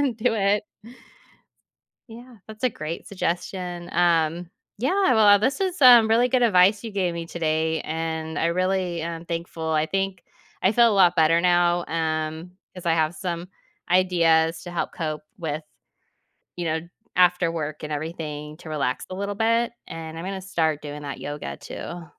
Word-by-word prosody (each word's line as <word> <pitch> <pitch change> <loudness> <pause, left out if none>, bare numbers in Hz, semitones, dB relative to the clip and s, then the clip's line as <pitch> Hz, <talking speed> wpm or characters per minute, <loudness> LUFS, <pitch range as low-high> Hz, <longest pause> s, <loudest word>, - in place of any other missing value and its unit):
and 270 -5 0
do 230 +1 +1
it. 205 0 +1 1.4
Yeah. 240 +1 -13
That's 215 +1 -12
a 255 - +4
great 160 -4 -6
suggestion. 180 -2 -3
Um, 170 0 +1 0.3
yeah. 280 - +2
Well, 205 -3 +6
this 260 - 0
is, 370 -4 -2
um, 240 -4 +9
really 235 +3 +3
good 250 0 +2
advice 200 -1 +4
you 225 - -6
gave 185 -3 -1
me 170 0 -5
today, 160 -1 -1
and 160 0 -4
I - - +1
really 185 0 0
am 165 0 -5
thankful. 170 -1 -5
I 155 -1 +2
think 195 0 -2 0.4
I 190 - +5
feel 235 +2 +5
a - - +1
lot 180 -3 +5
better 165 +1 +4
now, 175 -1 +3
um, 160 +1 -2 0.2
'cause 180 -1 -10
I 165 - +3
have 160 0 +1
some 175 0 -4 0.4
ideas 165 -3 +3
to 175 - -8
help 175 - -3
cope 155 -2 -4
with, 155 -3 -4 0.9
you 175 - -3
know, 160 0 -1 0.3
after 180 -1 +4
work 155 -2 -5
and 150 0 -4
everything 150 -1 -5
to 160 - -11
relax 140 -4 -2
a 185 - -5
little 200 +1 -3
bit. 230 +2 +1 0.2
And 160 0 -7
I'm 165 - -6
gonna 190 0 -4
start 160 -5 -1
doing 150 0 -7
that 140 -1 -6
yoga 145 0 -6
too. 170 -1 -8
175 Hz, 170 wpm, -24 LUFS, 160-200 Hz, 1.4 s, um